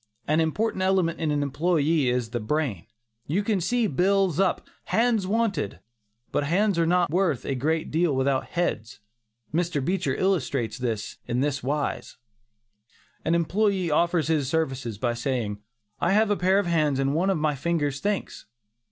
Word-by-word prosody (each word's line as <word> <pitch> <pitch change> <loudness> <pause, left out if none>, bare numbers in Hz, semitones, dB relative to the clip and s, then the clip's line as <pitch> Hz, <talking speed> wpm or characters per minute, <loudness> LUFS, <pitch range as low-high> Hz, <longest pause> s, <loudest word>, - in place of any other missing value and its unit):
An 155 +2 +2
important 185 +5 0
element 185 -3 +1
in 160 - 0
an 145 -1 +1
employee 150 0 +1
is 125 -2 -1
the 120 - -2
brain. 115 - -2 0.4
You 185 +8 0
can 200 -3 0
see 240 +6 +1
bills 190 0 +2
up, 195 -2 +1 0.2
"Hands 225 -4 +1
Wanted," 210 - -1 0.5
but - - 0
"hands" 185 +4 +1
are 165 - +2
not 175 -2 +2
worth 175 -7 +1
a - - -1
great 155 +5 -1
deal 160 -2 +2
without 130 0 +1
"heads." 130 -10 -2 0.5
Mr. 170 -2 0
Beecher 175 -6 0
illustrates 140 - 0
this, 115 -4 -3
in 125 +2 0
this 140 0 0
wise: 145 +3 -3 1.1
An 165 - +1
employee 185 +1 +1
offers 170 +1 +2
his 150 -5 +1
services 135 -8 -2
by 120 +2 0
saying, 120 -4 -2 0.4
"I 190 - +2
have 215 0 +3
a - - +3
pair 185 +1 +2
of 200 - +2
hands 155 -5 +1
and 135 +1 +1
one 175 +5 +1
of 190 - +2
my 155 -1 +1
fingers 145 -1 -1
thinks." 205 - -3
160 Hz, 165 wpm, -25 LUFS, 135-185 Hz, 1.1 s, have